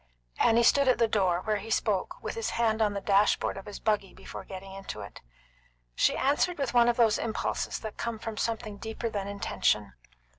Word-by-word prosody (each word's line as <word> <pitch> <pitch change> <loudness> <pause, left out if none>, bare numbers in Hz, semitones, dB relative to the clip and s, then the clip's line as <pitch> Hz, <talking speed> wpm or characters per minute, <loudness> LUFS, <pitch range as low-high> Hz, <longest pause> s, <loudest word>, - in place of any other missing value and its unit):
Annie 235 +1 +4
stood 280 +3 +4
at 255 - +4
the 230 - +3
door, 185 -5 +1
where 215 +1 0
he 210 +3 -8
spoke 210 -4 0
with - - -3
his 455 -1 -2
hand 225 -1 +2
on 210 -2 +2
the 200 - -2
dash 200 +1 +4
board - - -2
of 195 0 -9
his 205 - -7
buggy 210 -3 0
before - - -9
getting 190 0 -9
into 195 - -7
it. 100 - -10 0.7
She - - +2
answered 295 +6 +1
with 275 -4 -2
one 240 -1 +5
of 240 - +1
those 225 -3 +4
impulses 225 -1 -2
that 220 -2 -7
come 235 -1 -3
from 220 0 -6
something 220 -2 -3
deeper 225 +2 -4
than 200 -2 -3
intention. 105 - 0
215 Hz, 210 wpm, -29 LUFS, 195-235 Hz, 0.7 s, one